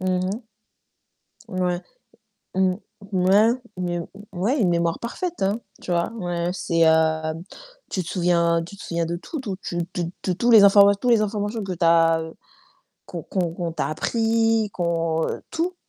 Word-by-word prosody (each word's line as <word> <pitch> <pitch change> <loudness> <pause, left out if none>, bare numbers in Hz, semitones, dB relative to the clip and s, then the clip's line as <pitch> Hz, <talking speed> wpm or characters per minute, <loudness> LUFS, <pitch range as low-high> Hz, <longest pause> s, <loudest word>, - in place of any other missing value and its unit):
Mmh 185 - -3 0.2
mh. - - -1 1.2
Ouais. 180 -2 -1 0.7
Mmh. 190 -1 +2 0.4
Ouais 195 +4 +4 0.3
mais 175 -1 -2
heu 170 - -5 0.3
ouais, 205 +10 0
une 185 - +3
mémoire 170 -1 +1
parfaite 335 - -4
hein. 200 +4 +1 0.2
Tu - - -7
vois? 170 +3 +1
Ouais, 175 -5 -2
c'est, 165 -3 +2
heu, 160 0 +2 0.6
tu 185 - -1
te 165 - -9
souviens 170 -2 +2
tu 200 +4 -11
te - - -11
souviens 170 0 -2
de 170 +1 -3
tout, 305 - -7
tout, 205 -8 -4
tu 175 - -5 0.2
tu 175 - -2 0.2
tu 185 - 0
tous 240 +5 +2
les 220 -3 +9
informa 200 0 +7
tous 245 +5 -1
les 230 - +5
informations 210 +1 -2
que 195 -2 -4
tu 175 - -2
as 165 -1 +4 0.8
qu'on - - -7
qu'on 180 -4 -2
qu'on 170 -1 -4
t'a - - -2
appris, 225 +4 +1
qu'on 165 -2 0 0.2
tout, 350 +3 -1
180 Hz, 170 wpm, -23 LUFS, 170-210 Hz, 1.2 s, les